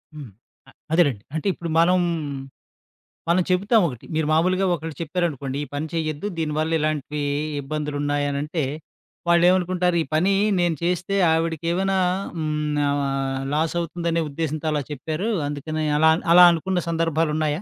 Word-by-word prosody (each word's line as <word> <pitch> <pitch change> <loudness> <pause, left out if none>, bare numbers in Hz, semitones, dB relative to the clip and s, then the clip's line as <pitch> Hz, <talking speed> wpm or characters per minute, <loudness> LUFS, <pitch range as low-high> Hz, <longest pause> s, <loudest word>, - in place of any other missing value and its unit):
హ్మ్. 140 -6 -8 0.4
అ - - -17 0.2
అదేలేండి. 145 - +2
అంటే, 160 - -2
ఇప్పుడు 170 - -6
మనం, 180 +2 +4 1.3
మనం 180 +1 +3
చెబుతామొకటి, 180 - +1
మీరు 160 -1 0
మాములుగా 185 +4 +2
ఒకళ్ళకు 160 -3 -5
చెప్పారనుకోండి, 145 -5 -2
ఈ - - -5
పని 155 +2 -2
చెయ్యద్దు, 155 +2 -2
దీని 155 -2 -1
వల్ల 160 +1 0
ఇలాంటీ 150 -1 -2 0.4
ఇబ్బందులున్నాయనంటే, 145 +1 -2 0.7
వాళ్ళేవనుకుంటారు, 180 0 +3
ఈ - - -10
పనీ 185 +5 +3 0.3
నేను 175 -2 +1
చేస్తే 180 +3 -1 0.2
ఆవిడకేవైనా 165 +4 0 0.4
హ్మ్, 155 -2 -2 0.3
ఆహ్, 135 -1 -1
లాసవుతుందనే 170 +1 -1
ఉద్దేశంతో 155 +1 -3
అలా 150 -1 0
చెప్పారూ, 155 - -3 0.2
అందుకనే. 155 +2 -3
అలాన్ 160 +1 +4
అలా 180 +1 +9
అనుకున్న 180 +2 -1
సందర్భాలున్నాయా? 160 -1 0
160 Hz, 125 wpm, -23 LUFS, 150-175 Hz, 1.3 s, అలా